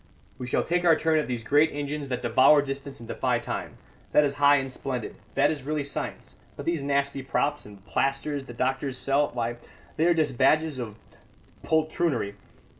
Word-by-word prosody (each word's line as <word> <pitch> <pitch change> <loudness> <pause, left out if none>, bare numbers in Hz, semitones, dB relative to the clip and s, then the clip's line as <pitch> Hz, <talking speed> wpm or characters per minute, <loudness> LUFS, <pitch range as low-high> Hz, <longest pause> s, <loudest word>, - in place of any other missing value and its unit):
We 125 - -5
shall - - +1
take 175 +1 0
our 165 -2 +6
turn 160 -1 +2
at 150 - -2
these 120 -3 -3
great 145 +6 +4
engines 145 0 -4
that 125 -2 -3
devour 130 +5 +5
distance 135 0 -6
and 115 - -10
defy - - 0
time. - - -5 0.4
That 150 - +6
is 140 -1 +1
high 145 0 +7
and 135 -1 -1
splendid 125 -3 -4 0.2
that 145 +2 +4
is 150 -3 -4
really 150 +2 -2
science. 140 - -6 0.2
But - - -7
these 170 -3 0
nasty 140 0 0
props 145 0 -1
and 100 -1 -14
plasters 140 +1 -1
the 120 - -9
doctors 130 +2 -1
sell 140 +2 +2
why, 120 -1 -3 0.4
they 160 +2 +3
are 175 - +4
just 150 -6 0
badges 155 +1 +3
of 110 -4 -5 0.7
poltroonery. 155 -8 0
140 Hz, 190 wpm, -26 LUFS, 130-150 Hz, 0.7 s, high